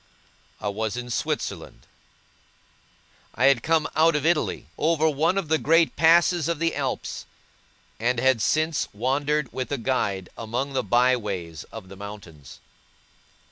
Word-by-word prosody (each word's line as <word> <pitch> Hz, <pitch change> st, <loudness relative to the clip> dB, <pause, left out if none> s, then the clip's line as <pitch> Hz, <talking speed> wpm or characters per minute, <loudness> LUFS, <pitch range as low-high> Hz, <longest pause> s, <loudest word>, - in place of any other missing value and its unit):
I 105 Hz, -, -4 dB
was 110 Hz, +2 st, -2 dB
in 125 Hz, 0 st, -5 dB
Switzerland. -, -, -4 dB, 1.5 s
I 125 Hz, -, +2 dB
had 135 Hz, -3 st, +5 dB
come 160 Hz, +1 st, +1 dB
out 160 Hz, 0 st, +4 dB
of 150 Hz, 0 st, -1 dB
Italy, 165 Hz, -2 st, 0 dB
over 160 Hz, 0 st, +2 dB
one 160 Hz, +5 st, +1 dB
of 195 Hz, -5 st, -1 dB
the 160 Hz, +1 st, +2 dB
great 165 Hz, +1 st, +3 dB
passes 170 Hz, 0 st, +4 dB
of 170 Hz, -, 0 dB
the 165 Hz, +1 st, 0 dB
Alps, 135 Hz, -3 st, -4 dB, 0.7 s
and 120 Hz, +2 st, +1 dB
had 130 Hz, -2 st, +3 dB
since 155 Hz, +5 st, +1 dB
wandered 140 Hz, +5 st, -1 dB
with 130 Hz, +1 st, -4 dB
a 140 Hz, -, 0 dB
guide 100 Hz, -7 st, -1 dB
among 120 Hz, +5 st, -3 dB
the 135 Hz, -, +1 dB
by 125 Hz, +1 st, +3 dB
ways 90 Hz, -9 st, -5 dB
of 95 Hz, -, -10 dB
the 95 Hz, -, -11 dB
mountains. 95 Hz, -9 st, -11 dB
130 Hz, 145 wpm, -25 LUFS, 110-155 Hz, 1.5 s, had